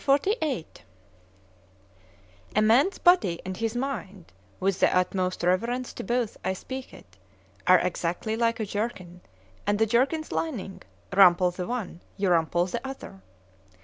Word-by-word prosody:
XLVIII 285 Hz, -, +1 dB, 1.9 s
A 215 Hz, -, +4 dB
MAN's 260 Hz, -, +4 dB
body 205 Hz, -, +4 dB
and 185 Hz, 0 st, -4 dB
his 225 Hz, +3 st, -2 dB
mind, 210 Hz, -8 st, -5 dB, 0.3 s
with 190 Hz, 0 st, 0 dB
the -, -, +3 dB
utmost 185 Hz, 0 st, -1 dB
reverence 235 Hz, +8 st, 0 dB
to -, -, -6 dB
both 240 Hz, +1 st, -1 dB
I 190 Hz, -, 0 dB
speak 260 Hz, +7 st, -7 dB
it, 95 Hz, +2 st, -16 dB, 0.5 s
are 185 Hz, -, +8 dB
exactly 180 Hz, +4 st, -2 dB
like 230 Hz, 0 st, +1 dB
a 220 Hz, -, -1 dB
jerkin, 195 Hz, -4 st, -4 dB, 0.5 s
and 205 Hz, 0 st, +1 dB
a 220 Hz, -, +4 dB
jerkin's 270 Hz, +8 st, +1 dB
lining;—rumple 190 Hz, -, +2 dB
the 180 Hz, 0 st, -5 dB
one,—you 200 Hz, -4 st, -3 dB
rumple 170 Hz, +1 st, +2 dB
the 180 Hz, -, -4 dB
other. 265 Hz, -, -8 dB
205 Hz, 130 wpm, -26 LUFS, 180-245 Hz, 1.9 s, are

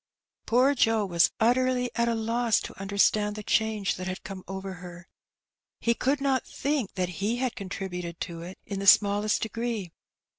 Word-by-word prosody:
Poor 255 Hz, +4 st, +4 dB
Joe 225 Hz, -5 st, +2 dB
was 170 Hz, -3 st, +3 dB
utterly 250 Hz, +1 st, +2 dB
at 235 Hz, 0 st, +1 dB
a 235 Hz, -, +1 dB
loss 230 Hz, 0 st, +1 dB
to -, -, -8 dB
understand 205 Hz, +1 st, +2 dB
the 210 Hz, -, -6 dB
change 215 Hz, -2 st, +1 dB
that 185 Hz, 0 st, -5 dB
had 185 Hz, 0 st, -5 dB
come 190 Hz, -1 st, -7 dB
over 195 Hz, 0 st, -5 dB
her. 175 Hz, -1 st, -10 dB, 0.7 s
He 235 Hz, -, +2 dB
could 270 Hz, +4 st, 0 dB
not 275 Hz, -2 st, +1 dB
think 280 Hz, -7 st, -2 dB
that 180 Hz, -2 st, -3 dB
he 220 Hz, +4 st, +1 dB
had 250 Hz, -2 st, -1 dB
contributed 180 Hz, -5 st, -5 dB
to 170 Hz, -2 st, -5 dB
it 180 Hz, +3 st, -8 dB
in 200 Hz, -1 st, -4 dB
the 200 Hz, -, -3 dB
smallest 205 Hz, +1 st, +5 dB
degree. 225 Hz, -4 st, -3 dB
210 Hz, 175 wpm, -27 LUFS, 190-235 Hz, 0.7 s, smallest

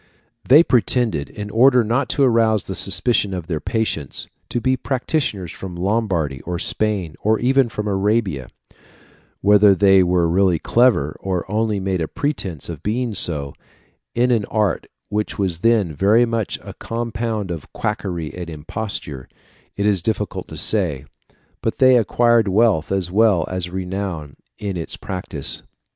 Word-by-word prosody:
] 120 Hz, 0 st, -28 dB
They 150 Hz, +6 st, +8 dB
pretended, 120 Hz, -, +1 dB
in 105 Hz, 0 st, -7 dB
order 125 Hz, +2 st, +5 dB
not 120 Hz, +5 st, 0 dB
to 140 Hz, -, +2 dB
arouse 115 Hz, -4 st, +3 dB
the 95 Hz, -, -6 dB
suspicion 100 Hz, 0 st, +1 dB
of 90 Hz, -3 st, -5 dB
their 80 Hz, -3 st, -3 dB
patients, 95 Hz, -, -2 dB, 0.2 s
to 120 Hz, -, -1 dB
be 130 Hz, +2 st, +1 dB
practitioners 130 Hz, -, -2 dB
from 95 Hz, -2 st, -8 dB
Lombardy 90 Hz, -, -1 dB
or 90 Hz, 0 st, -4 dB
Spain, 100 Hz, -3 st, -1 dB
or 110 Hz, +1 st, +2 dB
even 130 Hz, +1 st, +2 dB
from 105 Hz, -1 st, -4 dB
Arabia; 100 Hz, -, 0 dB, 0.9 s
whether 105 Hz, 0 st, +6 dB
they 95 Hz, 0 st, +5 dB
were 90 Hz, -1 st, +2 dB
really 90 Hz, 0 st, +3 dB
clever, 110 Hz, -, +2 dB
or 95 Hz, -2 st, -2 dB
only 110 Hz, -1 st, 0 dB
made 95 Hz, -2 st, -1 dB
a 80 Hz, -, -1 dB
pretence 95 Hz, -, -3 dB
of -, -, -7 dB
being 115 Hz, +2 st, -1 dB
so, 75 Hz, -7 st, 0 dB, 0.6 s
in 125 Hz, +1 st, +2 dB
an 115 Hz, -4 st, +2 dB
art 105 Hz, -2 st, -1 dB, 0.2 s
which 105 Hz, 0 st, -2 dB
was 95 Hz, -5 st, -1 dB
then 105 Hz, -5 st, +2 dB
very 105 Hz, +10 st, +4 dB
much 115 Hz, -3 st, -2 dB
a -, -, -9 dB
compound 115 Hz, -3 st, -3 dB
of 80 Hz, -4 st, -7 dB
quackery 85 Hz, -5 st, -3 dB
and 90 Hz, -2 st, -7 dB
imposture, 75 Hz, -3 st, -5 dB, 0.5 s
it 100 Hz, -, 0 dB
is 100 Hz, -4 st, +2 dB
difficult 105 Hz, 0 st, -2 dB
to -, -, -8 dB
say, 85 Hz, -11 st, +1 dB, 0.6 s
but -, -, -2 dB
they 130 Hz, -1 st, +6 dB
acquired 120 Hz, -1 st, +3 dB
wealth 100 Hz, -5 st, +2 dB
as 95 Hz, -3 st, -1 dB
well 100 Hz, -5 st, +3 dB
as 90 Hz, -1 st, -3 dB
renown 90 Hz, -5 st, -4 dB, 0.2 s
in 100 Hz, -3 st, -4 dB
its 80 Hz, -, -5 dB
practice. 90 Hz, -1 st, -4 dB
100 Hz, 155 wpm, -20 LUFS, 90-115 Hz, 0.9 s, They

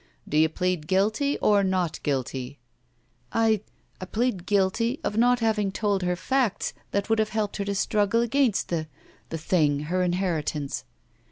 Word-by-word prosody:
"Do -, -, -4 dB
you 160 Hz, +1 st, +5 dB
plead 180 Hz, -2 st, -1 dB
guilty 215 Hz, -, +1 dB
or 205 Hz, -1 st, +4 dB
not 185 Hz, -3 st, 0 dB
guilty?'* 135 Hz, -1 st, -3 dB, 0.7 s
"I 220 Hz, -2 st, +2 dB, 0.2 s
— -, -, -26 dB
I -, -, -3 dB
plead 215 Hz, -3 st, -1 dB
guilty 210 Hz, +6 st, +1 dB
of -, -, -2 dB
not 245 Hz, +2 st, +3 dB
having 210 Hz, -3 st, +1 dB
told 200 Hz, -1 st, 0 dB
her 180 Hz, 0 st, 0 dB
facts 255 Hz, +2 st, 0 dB, 0.2 s
that 200 Hz, 0 st, -1 dB
would 225 Hz, 0 st, +2 dB
have 215 Hz, -1 st, +1 dB
helped 215 Hz, -2 st, -2 dB
her 200 Hz, -, -2 dB
to 200 Hz, 0 st, -2 dB
struggle 210 Hz, +3 st, +2 dB
against 240 Hz, -2 st, +1 dB
the 160 Hz, -2 st, -2 dB, 0.2 s
— -, -, -31 dB
the 165 Hz, -, -3 dB
thing 155 Hz, -3 st, +2 dB
— 150 Hz, -, -7 dB
her 185 Hz, -, +2 dB
inheritance." 175 Hz, -6 st, -1 dB
195 Hz, 175 wpm, -26 LUFS, 170-220 Hz, 0.7 s, you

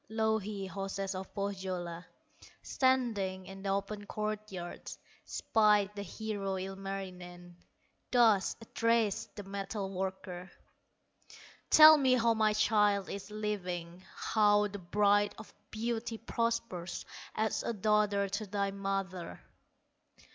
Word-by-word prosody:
Louhi, 220 Hz, -2 st, -1 dB
hostess 195 Hz, 0 st, -4 dB
of 190 Hz, 0 st, -6 dB
Pohyola, 185 Hz, -4 st, -3 dB, 0.6 s
Standing 220 Hz, -8 st, +1 dB
in 195 Hz, 0 st, -10 dB
the 195 Hz, -, -3 dB
open 200 Hz, +1 st, -2 dB
court 215 Hz, 0 st, -3 dB
yard, 175 Hz, -2 st, -7 dB, 0.3 s
Spied 210 Hz, -2 st, +3 dB
the 205 Hz, -, -5 dB
hero, 200 Hz, 0 st, -4 dB
Ilmarinen, 185 Hz, -2 st, -7 dB, 0.5 s
Thus 225 Hz, -6 st, +4 dB
addressed 225 Hz, -1 st, 0 dB
the 205 Hz, -, -6 dB
metal 195 Hz, 0 st, -4 dB
worker: 185 Hz, -1 st, -4 dB, 1.2 s
"Tell 310 Hz, 0 st, +10 dB
me 260 Hz, -2 st, +4 dB
how 230 Hz, -1 st, +3 dB
my 215 Hz, -1 st, +2 dB
child 210 Hz, -2 st, +2 dB
is 200 Hz, +1 st, -6 dB
living, 185 Hz, -5 st, -4 dB
How 210 Hz, -1 st, +3 dB
the 205 Hz, 0 st, -7 dB
Bride 205 Hz, +3 st, +2 dB
of -, -, -11 dB, 0.2 s
Beauty 225 Hz, 0 st, -3 dB
prospers, 230 Hz, -7 st, -2 dB, 0.3 s
As 220 Hz, 0 st, 0 dB
a -, -, -2 dB
daughter 210 Hz, -1 st, +2 dB
to 205 Hz, +2 st, -3 dB
thy 200 Hz, 0 st, -1 dB
mother." 195 Hz, -2 st, -3 dB
200 Hz, 110 wpm, -32 LUFS, 190-215 Hz, 1.2 s, Tell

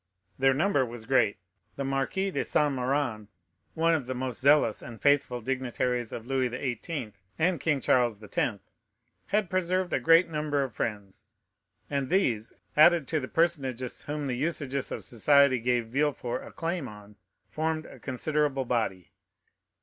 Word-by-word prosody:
Their 135 Hz, 0 st, +4 dB
number 155 Hz, -2 st, +2 dB
was 120 Hz, -2 st, -7 dB
great. 115 Hz, -5 st, +2 dB, 0.4 s
The 140 Hz, -, -3 dB
Marquis 135 Hz, +9 st, -1 dB
de -, -, -1 dB
Saint 150 Hz, -2 st, +1 dB
Méran, 125 Hz, -4 st, -1 dB, 0.5 s
one 165 Hz, 0 st, +3 dB
of 145 Hz, -6 st, -1 dB
the 130 Hz, -, -3 dB
most 130 Hz, -1 st, -3 dB
zealous 140 Hz, -5 st, +4 dB
and 115 Hz, -1 st, -9 dB
faithful 140 Hz, -4 st, +2 dB
dignitaries 125 Hz, -1 st, -2 dB
of 115 Hz, -, -6 dB
Louis 130 Hz, -1 st, 0 dB
XVIII. 130 Hz, -, -4 dB, 0.2 s
and 170 Hz, 0 st, +1 dB
King 145 Hz, 0 st, +1 dB
Charles 120 Hz, -5 st, +2 dB
X., 105 Hz, +1 st, -1 dB, 0.7 s
had 210 Hz, -1 st, +1 dB
preserved 185 Hz, 0 st, 0 dB
a -, -, +2 dB
great 165 Hz, +2 st, +5 dB
number 150 Hz, -3 st, -1 dB
of 130 Hz, -, -5 dB
friends, 105 Hz, -4 st, -5 dB, 0.6 s
and 140 Hz, -2 st, -2 dB
these, 120 Hz, -, +1 dB, 0.2 s
added 160 Hz, -1 st, +6 dB
to 160 Hz, -, +1 dB
the 130 Hz, -, -5 dB
personages 135 Hz, -7 st, -1 dB
whom 150 Hz, 0 st, -4 dB
the 130 Hz, -, -1 dB
usages 140 Hz, -1 st, -2 dB
of -, -, -4 dB
society 140 Hz, +2 st, +4 dB
gave 120 Hz, 0 st, +1 dB
Villefort 130 Hz, -2 st, -1 dB
a -, -, -11 dB
claim 165 Hz, -3 st, -3 dB
on, 105 Hz, -1 st, -12 dB, 0.3 s
formed 155 Hz, 0 st, -2 dB
a -, -, -12 dB
considerable 140 Hz, +1 st, -1 dB
body. 110 Hz, -7 st, -2 dB
135 Hz, 155 wpm, -28 LUFS, 120-155 Hz, 0.7 s, added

